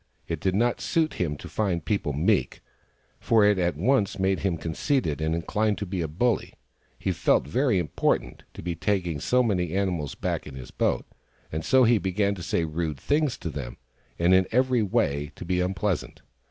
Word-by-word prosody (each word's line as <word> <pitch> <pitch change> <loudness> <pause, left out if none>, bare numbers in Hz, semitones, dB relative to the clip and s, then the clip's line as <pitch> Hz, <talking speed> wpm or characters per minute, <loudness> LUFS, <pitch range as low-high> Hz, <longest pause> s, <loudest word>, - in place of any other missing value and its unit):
It 85 -2 -3
did 95 +3 0
not 120 +3 +1
suit 160 -1 +1
him 75 -4 -1
to - - -9
find 90 -7 -1
people 100 -5 0
meek, 75 +3 +1 0.6
for 110 -2 +4
it 105 -2 +4
at 85 -1 +1
once 125 -6 +2
made 95 0 +1
him 95 -3 0
conceited 80 - -1
and 80 +1 0
inclined 105 +5 0
to 100 - -3
be 95 -1 -3
a 80 - -1
bully. 110 +10 0 0.4
He - - -1
felt - - +2
very 125 - +2
important, 75 -7 -1
to - - -8
be 85 0 -2
taking 85 -3 -1
so 125 - +2
many 90 -6 0
animals 90 -7 -1
back - - -3
in 70 - -9
his 65 -1 -9
boat; - - 0 0.5
and 80 +1 -3
so 130 -1 +4
he 115 -2 +4
began 100 +2 0
to 95 - -8
say 85 0 0
rude 80 -1 -3
things 145 - 0
to 85 - -5
them, 65 -4 -6 0.4
and 85 +2 +3
in 95 0 +4
every 125 0 +3
way 75 -7 0
to - - -8
be 90 +1 0
unpleasant. 95 -1 -2
95 Hz, 195 wpm, -26 LUFS, 80-105 Hz, 0.6 s, for